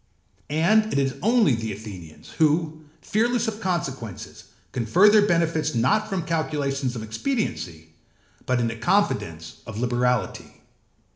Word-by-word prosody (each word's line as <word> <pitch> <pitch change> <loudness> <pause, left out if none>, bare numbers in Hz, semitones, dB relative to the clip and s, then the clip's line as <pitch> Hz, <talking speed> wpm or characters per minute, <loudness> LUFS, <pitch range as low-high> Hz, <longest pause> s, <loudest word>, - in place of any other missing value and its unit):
And 215 +9 +3
it - - 0
is 135 -1 +1
only 220 - +4
the 110 -1 -3
Athenians, 95 -7 -10
who, 155 0 +1 0.2
fearless 235 +2 +1
of 220 0 -4
consequences, 135 - -4 0.3
confer 130 - +4
their 205 -1 +5
benefits 160 -4 +1
not 135 - +2
from 190 -4 -2
calculations 145 -5 -1
of 115 - -5
expediency, 110 - -3 0.5
but 125 -1 +2
in 120 - +1
the 115 - -3
confidence 110 - 0
of 110 -1 -7
liberality. 125 -3 -1
145 Hz, 130 wpm, -24 LUFS, 115-190 Hz, 0.5 s, their